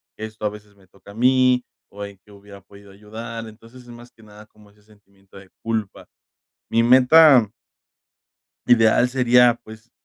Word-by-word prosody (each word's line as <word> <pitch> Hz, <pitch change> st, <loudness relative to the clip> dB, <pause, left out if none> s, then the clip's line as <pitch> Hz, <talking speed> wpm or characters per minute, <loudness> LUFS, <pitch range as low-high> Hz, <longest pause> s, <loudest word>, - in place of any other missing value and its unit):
esto 110 Hz, 0 st, -9 dB
a -, -, 0 dB
veces 105 Hz, 0 st, -15 dB
me 95 Hz, -1 st, -25 dB
toca 100 Hz, +2 st, -18 dB
a -, -, -15 dB
mí, 125 Hz, +2 st, +1 dB, 0.2 s
o 100 Hz, 0 st, -9 dB
en 100 Hz, -1 st, -13 dB
qué 105 Hz, -, -21 dB
hubiera 100 Hz, 0 st, -16 dB
podido 100 Hz, +1 st, -19 dB
ayudar, 115 Hz, +3 st, -10 dB
entonces, 115 Hz, +3 st, -17 dB
es -, -, -22 dB
más 120 Hz, 0 st, -15 dB
que 110 Hz, -, -23 dB
nada, 105 Hz, 0 st, -17 dB
como 105 Hz, -1 st, -23 dB
ese 105 Hz, 0 st, -29 dB
sentimiento 100 Hz, -2 st, -23 dB
de 95 Hz, -1 st, -16 dB
culpa. 110 Hz, -3 st, -5 dB, 0.6 s
Mi 115 Hz, -, +1 dB
meta 130 Hz, 0 st, +5 dB, 1.2 s
ideal 120 Hz, +1 st, +3 dB
sería, 125 Hz, -1 st, +2 dB
pues, 110 Hz, +2 st, -15 dB
110 Hz, 165 wpm, -20 LUFS, 100-120 Hz, 1.2 s, meta